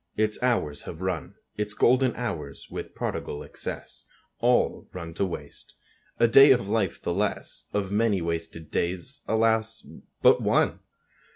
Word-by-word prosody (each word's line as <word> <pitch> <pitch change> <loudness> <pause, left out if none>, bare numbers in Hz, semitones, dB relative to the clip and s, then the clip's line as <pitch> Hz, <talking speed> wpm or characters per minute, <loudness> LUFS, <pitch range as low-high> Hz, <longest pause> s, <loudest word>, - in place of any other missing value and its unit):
Its 105 0 0
hours 115 - 0
have 80 - -8
run, 90 -4 -3 0.2
Its 105 0 -2
golden 130 +3 +4
hours, 75 - -5
with - - -6
prodigal 75 - -4
excess, - - -6 0.3
All - - +2
run 85 -2 -6
to 90 - -1
waste. 90 - -8 0.4
A 115 - +6
day 135 +5 +8
of 125 -6 +4
life 105 -4 0
the 85 - -2
less; 105 +3 -2
Of 100 -2 -2
many 105 -1 +2
wasted 85 -1 -4
days, 95 +12 -2
alas, 110 0 +1 0.4
but - - +6
one! - - +2
105 Hz, 145 wpm, -26 LUFS, 85-115 Hz, 0.4 s, day